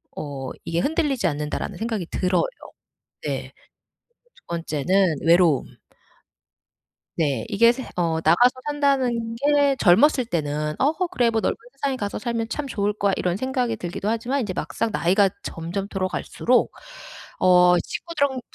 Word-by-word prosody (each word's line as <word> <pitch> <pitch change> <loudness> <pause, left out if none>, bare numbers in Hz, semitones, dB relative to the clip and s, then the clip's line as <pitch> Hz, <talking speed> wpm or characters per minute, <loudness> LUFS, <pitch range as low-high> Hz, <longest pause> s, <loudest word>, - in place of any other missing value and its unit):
어 135 -3 -5
이게 165 0 -1
흔들리지 280 - 0
않는다라는 150 -2 -3
생각이 220 -5 -3
들어요. 185 - +1 0.8
네. - - -4
그리고 - - -30 0.7
2 - - -22
번째는 170 +2 +1
외로움. 170 -4 +3 1.4
네. 140 -8 0
이게 230 +4 +5
새 255 +2 -6
어 165 -2 0
나가서 180 +11 +5 0.2
산다는 260 -6 0
게 285 +2 +3
젊었을 250 +8 +5
때는 150 -5 -2
'어 280 +3 +3 0.2
그래 250 -10 +1
뭐 225 - 0
넓은 - - 0 0.2
세상에 275 -1 -2
가서 205 -5 -4
살면 230 0 -3
참 295 +1 -3
좋을 205 -4 -1
거야.' 200 -1 0
이런 180 +1 -1
생각이 255 -2 -1
들기도 175 +1 -5
하지만 240 +5 -1
이제 205 -6 -3
막상 230 - -2
나이가 195 +2 +3
점점 175 +4 -5
들어갈수록 195 +5 0 0.7
어 180 -1 +5
친구들이랑 285 - -2
205 Hz, 305 characters per minute, -23 LUFS, 175-255 Hz, 1.4 s, 이게